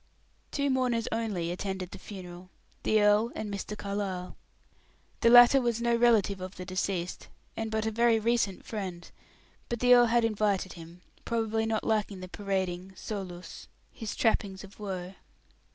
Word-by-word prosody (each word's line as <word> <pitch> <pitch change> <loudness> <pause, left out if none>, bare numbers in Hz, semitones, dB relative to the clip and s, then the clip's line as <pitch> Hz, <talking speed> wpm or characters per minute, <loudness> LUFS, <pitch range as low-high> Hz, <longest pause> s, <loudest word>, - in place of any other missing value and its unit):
Two 280 -1 0
mourners 250 -3 +1
only 205 -7 -1
attended 190 0 -4
the 195 - -9
funeral 180 -2 -10 0.3
the 215 - +3
earl 210 +3 +4
and 210 -1 -4
Mr. 205 +1 -5
Carlyle. 200 -3 -4 0.8
The 230 - +4
latter 245 +3 +8
was 235 -2 0
no 235 0 +2
relative 220 -5 +3
of 185 +1 -6
the 180 - -7
deceased, 185 -1 -3 0.3
and 225 0 -3
but 220 0 -1
a 220 - 0
very 230 0 +3
recent 225 -4 0
friend; 185 -5 -6 0.6
but 235 - -2
the 250 +1 +6
earl 245 -1 +7
had 235 0 +3
invited 205 -4 0
him, 170 +1 -12 0.2
probably 225 -1 0
not 220 -1 -1
liking 210 -3 0
the 185 - -7
parading, 190 -1 -3
solus, 185 -3 -7 0.3
his 225 -3 -5
trappings 200 -4 0
of 200 +1 -14
woe. 190 -3 -5
205 Hz, 155 wpm, -29 LUFS, 185-225 Hz, 0.8 s, latter